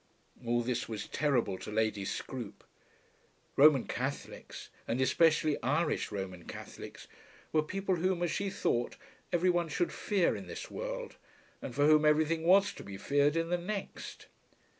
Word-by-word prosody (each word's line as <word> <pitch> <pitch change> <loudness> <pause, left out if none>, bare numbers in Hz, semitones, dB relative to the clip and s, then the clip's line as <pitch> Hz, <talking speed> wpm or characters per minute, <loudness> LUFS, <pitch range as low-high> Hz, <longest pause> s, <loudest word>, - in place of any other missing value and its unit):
All 120 0 +1
this 125 0 -2
was 110 -2 -4
terrible 125 -10 0
to - - -7
Lady 110 -2 0
Scroope. 120 +1 -5 0.9
Roman 140 -2 +7
Catholics, 130 +3 -5 0.2
and 115 +3 -1
especially 155 +3 +3
Irish 150 +2 0
Roman 95 -4 -5
Catholics, - - -9 0.4
were 155 - +3
people 190 +4 -1
whom, 180 +1 0
as 170 - 0
she 200 0 -1
thought, 120 -9 -1 0.4
every 180 +1 +3
one 175 -2 0
should 175 +3 -1
fear 200 -5 +1
in - - -7
this - - -7
world, - - -5 0.4
and - - -6
for 145 - +3
whom 155 0 +6
everything 155 +2 +3
was 195 +3 +5
to - - -10
be 100 -1 -8
feared 145 +6 +2
in 165 0 0
the 175 0 +1
next. 195 +3 -6
150 Hz, 155 wpm, -32 LUFS, 120-175 Hz, 0.9 s, Roman